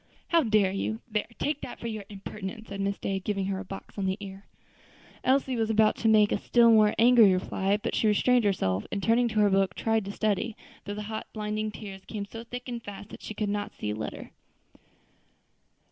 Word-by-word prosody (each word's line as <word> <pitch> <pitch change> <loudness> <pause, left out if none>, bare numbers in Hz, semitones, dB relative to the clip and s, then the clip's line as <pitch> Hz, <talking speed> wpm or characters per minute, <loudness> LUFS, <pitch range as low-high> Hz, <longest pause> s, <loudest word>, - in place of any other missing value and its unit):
"How 335 -1 +5
dare 215 -7 +3
you? 220 +3 -2
there! 210 0 0
take 295 0 -1
that - - -7
for - - -9
your 215 -3 -4
impertinence," 210 +2 -7
said 200 0 -4
Miss 200 0 -1
Day, 195 0 -2
giving 195 0 -2
her 190 0 -2
a - - -5
box 195 +1 -9
on 195 - 0
the 190 +1 0
ear. 195 -1 -9 0.8
Elsie 265 0 +2
was 225 -2 0
about 220 -1 +4
to 225 - 0
make 215 -1 +5
a - - +1
still 235 -1 +5
more 215 -1 +5
angry 230 -3 +7
reply; 190 +2 0
but 210 - -4
she 220 - +2
restrained 245 +3 +3
herself, 100 - 0
and 200 -2 -3
turning 235 +2 +3
to 215 -2 -1
her 205 - +5
book, 195 -1 +2
tried 225 -2 0
to 200 - -4
study, 215 +2 -1 0.3
though 205 - -4
the 210 - -5
hot, 220 +1 -5
blinding 215 0 -2
tears 195 -2 -9
came 205 -1 -5
so 225 +3 -9
thick 245 +2 -8
and 240 -2 -4
fast 205 -1 -9
that - - -11
she 215 - -7
could 210 - -1
not 205 0 -3
see 105 - -3
a - - -3
letter. 110 - -6
210 Hz, 220 wpm, -28 LUFS, 195-225 Hz, 0.8 s, angry